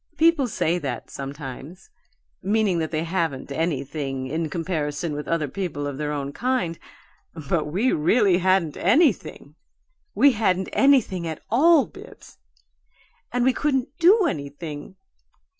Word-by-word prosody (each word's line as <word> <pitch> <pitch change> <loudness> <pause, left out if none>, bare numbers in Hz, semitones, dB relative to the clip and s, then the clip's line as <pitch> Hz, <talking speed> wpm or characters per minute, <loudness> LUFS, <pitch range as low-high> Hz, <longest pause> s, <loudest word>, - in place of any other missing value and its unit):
People 325 -5 +4
say 175 -5 0
that, 140 -5 -5
sometimes, 140 +5 -8 0.5
meaning 200 -2 +1
that 160 -1 -2
they 155 0 -2
haven't 165 -6 -2
anything 140 -3 -2
in 160 +4 -2
comparison 160 -2 -3
with 150 0 -5
other 165 -3 0
people 150 -3 -4
of 140 -1 -5
their 150 -1 -2
own 140 -1 -4
kind, 245 - -1 0.7
but 160 +1 +1
we 195 +12 0
really 185 +4 +3
hadn't 185 -4 +1
anything 205 - +1 0.6
we 285 - +6
hadn't 190 -5 0
anything 240 -11 +3
at 160 -2 -6
all, 295 +3 +5
Bibbs! - - -14 0.9
And 245 0 +1
we 260 - +4
couldn't 270 -1 -1
DO 380 +4 +6
anything. 145 - -5
170 Hz, 130 wpm, -24 LUFS, 150-230 Hz, 0.9 s, we